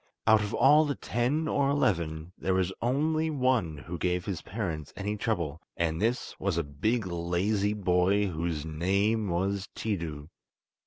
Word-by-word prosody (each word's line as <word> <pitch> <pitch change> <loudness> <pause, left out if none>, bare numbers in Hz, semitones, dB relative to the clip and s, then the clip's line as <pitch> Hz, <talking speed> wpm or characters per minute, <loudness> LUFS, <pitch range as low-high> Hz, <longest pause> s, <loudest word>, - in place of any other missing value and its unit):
Out 110 -1 +6
of 105 0 -3
all 145 +6 +5
the 145 -2 -1
ten 135 +7 0
or 140 -2 +2
eleven, 85 - 0
there 95 0 0
was 95 0 +1
only 155 +6 +1
one 130 - +1
who 85 +3 -7
gave 90 0 0
his 95 -5 -3
parents 85 -8 -4
any 105 +1 -2
trouble, 85 -9 -2 0.2
and 80 -1 0
this 115 +3 0
was 95 -3 0
a 85 - +1
big 105 +11 -1
lazy 90 +4 0
boy 95 0 +2
whose 80 -4 -2
name 100 +7 +1
was 95 +3 -1
Tiidu. 80 -9 -3
95 Hz, 155 wpm, -29 LUFS, 85-115 Hz, 0.2 s, Out